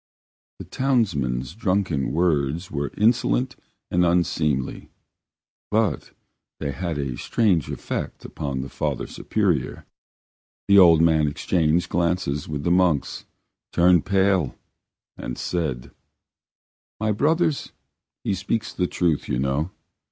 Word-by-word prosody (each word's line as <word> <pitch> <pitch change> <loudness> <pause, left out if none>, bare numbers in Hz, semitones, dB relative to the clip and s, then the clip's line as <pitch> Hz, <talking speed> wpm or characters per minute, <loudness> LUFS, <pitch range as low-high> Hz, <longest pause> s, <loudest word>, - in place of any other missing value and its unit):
The - - -8
townsman's 75 - 0
drunken 95 - 0
words 80 0 0
were 70 0 -2
insolent 120 +3 +2 0.4
and 90 0 +3
unseemly, 80 -6 0 0.8
but 105 -7 0 0.5
they 70 - -2
had 85 +1 -3
a 70 -4 -3
strange 95 -10 +1
effect - - -5
upon 70 -2 -4
the 65 - -6
Father - - -2
Superior. 90 -11 -1 0.8
The 100 0 +7
old 85 -3 +7
man 80 -2 +3
exchanged 80 +2 +1
glances 85 -4 -1
with 75 -1 -4
his 85 - +3
monks, 90 -5 +1 0.5
turned 90 -1 +4
pale, 95 -6 +2 0.6
and - - -6
said: 75 -9 -3 1.1
"My 110 0 +1
brothers, 155 - +1 0.5
he - - 0
speaks 110 +5 -2
the 90 - 0
truth, 85 -5 0
you 60 - 0
know. 70 +5 0
85 Hz, 115 wpm, -23 LUFS, 70-100 Hz, 1.1 s, The